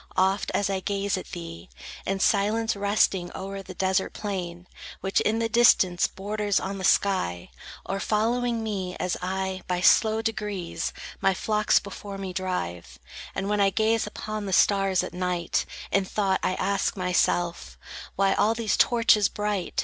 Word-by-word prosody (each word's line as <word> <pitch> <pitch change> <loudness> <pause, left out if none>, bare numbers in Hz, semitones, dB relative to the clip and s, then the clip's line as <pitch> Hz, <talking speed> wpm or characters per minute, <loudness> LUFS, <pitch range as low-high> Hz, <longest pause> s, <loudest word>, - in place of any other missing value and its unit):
Oft 190 +2 +2
as 205 - +1
I 195 -1 -1
gaze 200 +1 -1
at 185 - -6
thee, 165 - -8 0.4
In 195 0 -1
silence 215 +3 +2
resting 200 -3 +1
o'er 195 +1 -5
the 185 -1 -10
desert 190 +1 0
plain, 180 -4 -5 0.4
Which 190 +1 +1
in 220 +1 +1
the 230 0 0
distance 220 -6 +4
borders 205 +1 -1
on 195 +1 -4
the - - -5
sky, 180 - +1 0.3
Or 195 +1 -3
following 230 +3 0
me, 190 -4 -3
as 180 - -1
I, 190 0 -2
by 180 -1 -1
slow 220 +4 +4
degrees, 210 -5 -3 0.3
My 195 - +3
flocks 210 +1 +2
before 200 0 -5
me 190 -2 -5
drive; 90 - -4 0.4
And 195 0 -2
when 210 0 +1
I 195 - +5
gaze 220 +2 +1
upon 215 0 -5
the 190 - -2
stars 195 -1 +3
at - - -6
night, 180 -1 -1 0.2
In 195 - +3
thought 190 0 0
I 185 - 0
ask 195 +1 -1
myself, 175 - 0 0.4
"Why 195 0 +3
all 220 +2 +2
these 225 -2 0
torches 230 -4 +4
bright? 210 -3 -2
195 Hz, 160 wpm, -26 LUFS, 185-210 Hz, 0.4 s, I